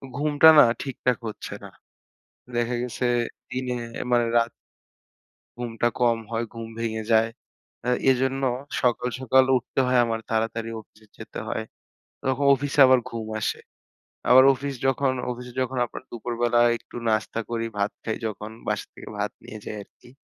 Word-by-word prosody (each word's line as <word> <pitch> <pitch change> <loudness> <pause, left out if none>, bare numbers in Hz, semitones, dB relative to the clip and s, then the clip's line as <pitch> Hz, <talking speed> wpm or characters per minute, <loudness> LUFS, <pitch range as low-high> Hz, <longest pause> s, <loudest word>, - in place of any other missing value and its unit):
ঘুমটা 150 +2 +6
না - - +10 0.2
ঠিকঠাক 125 -2 -1
হচ্ছে 105 - -7
না। - - -8 0.9
দেখা 120 +1 0
গেছে 125 0 -3 0.4
দিনে 125 -1 -2 0.4
মানে 120 -1 +4
রাত 115 0 +2 1.1
ঘুমটা 120 -1 -1
কম 120 -1 +3
হয়, 115 +1 -1
ঘুম 115 -1 -6
ভেঙে 110 -1 -2
যায়। 110 0 +4 0.5
অ্যা 125 - 0 0.2
এজন্য 130 +1 0 0.4
সকাল, 125 0 +1
সকাল 130 0 +4
উঠতে 125 - -4
হয় 125 -1 +3
আমার, 115 -1 -1
তাড়াতাড়ি 115 0 -1
অফিসে 110 +1 -24
যেতে - - -8
হয়। - - -2 0.6
তখন 130 -1 0 0.2
অফিসে 145 +2 -1
আবার 130 -1 +6
ঘুম 115 -2 -5
আসে। - - -1 0.7
আবার 130 +1 +9
অফিস 140 +1 -4
যখন 135 0 +2 0.2
অফিসে 125 0 -8
যখন 130 0 -2
আপনার 120 - -9
দুপুরবেলায় 120 0 +2
একটু - - -17
নাস্তা 110 +1 0
করি, 115 -1 -2
ভাত 100 +1 +1
খাই 110 - -2
যখন, 105 +1 -6 0.2
বাসা - - -1
থেকে - - -11
ভাত - - -1
নিয়ে 110 - -9
যাই 105 - -5
আরকি। 120 - -21
120 Hz, 150 wpm, -25 LUFS, 115-130 Hz, 1.1 s, না